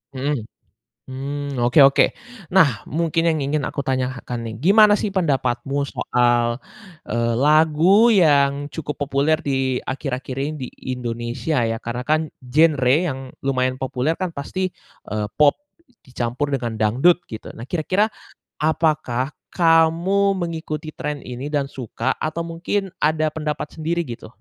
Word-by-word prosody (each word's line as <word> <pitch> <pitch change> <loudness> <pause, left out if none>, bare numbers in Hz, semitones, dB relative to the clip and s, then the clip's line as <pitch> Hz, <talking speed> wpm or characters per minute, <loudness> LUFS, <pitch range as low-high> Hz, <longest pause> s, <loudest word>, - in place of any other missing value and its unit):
Mhm, 140 0 -1 0.7
mmm, 140 0 -4
oke 120 +5 +4
oke. 140 - +6 0.5
Nah, 140 - +5
mungkin 165 +2 +1
yang 160 - +1
ingin 145 +1 0
aku 140 - -4
tanyakan 130 -2 -2
nih, 110 - -6
gimana 210 +2 +6
sih 205 -2 -2
pendapatmu 140 -5 0
soal, 120 -3 +1 0.5
eee, 115 +1 0
lagu 160 - +5
yang 145 -7 +3
cukup 150 -3 -5
populer 145 +2 +1
di 135 -2 0
akhir-akhir 130 -1 -4
ini 145 +3 -1
di - - -6 0.3
Indonesia 120 +4 -2
ya, 115 - -1
karena 120 +2 -5
kan 155 0 +3 0.2
genre 130 0 +3 0.2
yang 135 -2 -3 0.3
lumayan 130 -1 0
populer 130 +4 -1
kan 185 -2 -3
pasti, 185 +6 -3 0.4
eee, 105 -1 -2
pop 150 -1 +6 0.5
dicampur 125 +2 -3
dengan 120 -5 -2
dangdut 130 +12 +4
gitu. 110 -2 -8
Nah 115 - -10
kira-kira 185 +6 +1 0.5
apakah 150 -4 0 0.2
kamu 170 +4 +3
mengikuti 160 -3 -4
trend 150 -1 -5
ini 125 +3 -6
dan 145 -2 0
suka 125 0 -3
atau 165 +2 -2
mungkin 180 +4 -3
ada 155 0 +2
pendapat 150 0 -4
sendiri 170 +2 -1
gitu? 120 -2 -8
145 Hz, 135 wpm, -21 LUFS, 125-160 Hz, 0.7 s, oke